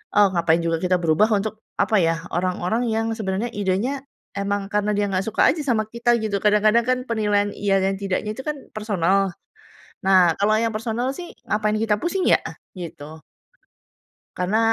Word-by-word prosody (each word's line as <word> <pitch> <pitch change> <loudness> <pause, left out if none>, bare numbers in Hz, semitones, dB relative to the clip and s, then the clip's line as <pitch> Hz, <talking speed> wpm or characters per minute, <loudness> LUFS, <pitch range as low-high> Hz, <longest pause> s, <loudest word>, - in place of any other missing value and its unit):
oh, 205 -1 +6
ngapain 170 -1 +2
juga 165 0 0
kita 185 +1 +1
berubah 165 +6 +3
untuk 215 +1 -3 0.2
apa 200 +1 +3
ya, 165 -1 +2 0.2
orang-orang 185 +6 -1
yang 225 0 0
sebenarnya 220 +1 -2
idenya 205 +7 -1 0.4
emang 200 0 -2
karena 210 0 +1
dia 205 0 +1
nggak 185 0 0
suka - - +3
aja 310 0 -3
sama 230 -5 +1
kita 235 +1 +1
gitu, 205 -2 0
kadang-kadang 215 +2 +4
kan 255 0 +2
penilaian 205 -3 +1
iya 195 -1 +1
dan 195 0 +1
tidaknya 200 +2 -2
itu 265 - -7
kan 300 - -1 0.2
personal. 195 -2 +1 0.7
Nah, 185 -3 +5
kalau 205 +2 +2
yang 230 - +1
personal 230 +3 -2
sih, 350 +3 -9 0.2
ngapain 215 0 +1
kita 215 -1 +1
pusing 370 +2 -1
ya? - - +5 0.4
Gitu. 155 -2 -9 1.2
Karena 185 +4 0
205 Hz, 165 wpm, -22 LUFS, 190-225 Hz, 1.2 s, oh